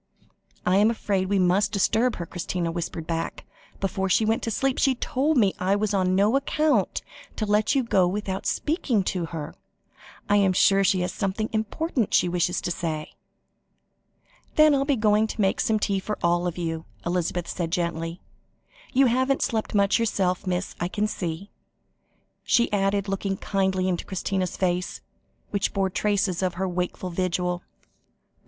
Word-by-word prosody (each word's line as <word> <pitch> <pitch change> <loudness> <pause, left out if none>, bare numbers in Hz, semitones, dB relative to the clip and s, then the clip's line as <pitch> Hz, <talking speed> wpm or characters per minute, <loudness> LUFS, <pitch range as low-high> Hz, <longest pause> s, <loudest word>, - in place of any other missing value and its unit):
"I 180 +1 +3
am 210 +2 +5
afraid 195 -4 -1
we 200 - +2
must 185 +2 +3
disturb 225 +5 +2
her," 170 - -5
Christina 175 0 -3
whispered 165 -1 -4
back. 165 0 -3 0.3
"Before 190 0 -1
she 215 +4 +3
went 225 +1 +1
to - - -2
sleep, 270 +4 0
she 265 -2 +3
told 275 +5 0
me 200 -5 +4
I 190 +2 +2
was 210 0 0
on 185 -1 +2
no 205 +6 +3
account 275 -5 +1 0.3
to 215 - -2
let 210 +5 +2
you 270 - +3
go 190 -6 +3
without 190 0 -3
speaking 275 - 0
to 180 -3 -2
her. 160 -2 -6 0.7
I 205 - +4
am 195 -2 +3
sure 195 +2 +4
she 190 -1 +2
has 180 - -2
something 210 +2 -2
important 225 - -1
she - - +4
wishes 175 0 0
to - - -2
say." 160 -3 -3 1.4
"Then 305 -1 +6
I'll 275 0 +2
be 285 -1 +2
going 215 -1 +3
to 220 - -7
make 190 -1 +2
some 220 - +2
tea 200 -2 0
for 210 +3 -4
you - - -21
all," 175 -1 -1 0.2
Elizabeth 175 0 -1
said 170 -2 -3
gently; 170 0 -2 0.7
"you 270 +1 +5
haven't 260 +3 +2
slept 220 -4 -2
much 200 +2 +3
yourself, 190 -5 0
miss, 180 +1 -2
I 175 - 0
can 205 +3 -1
see," 180 -2 -4 0.9
she 235 -3 +2
added, 200 0 +1
looking 195 0 -2
kindly 190 -2 0
into 180 -2 -1
Christina's 190 -1 -2
face, 180 -1 -1 0.5
which 200 -1 0
bore 195 -1 +1
traces 200 -2 0
of 185 -2 -1
her 190 +1 -1
wakeful 180 0 -3
vigil. 180 0 -1
195 Hz, 165 wpm, -25 LUFS, 180-215 Hz, 1.4 s, Then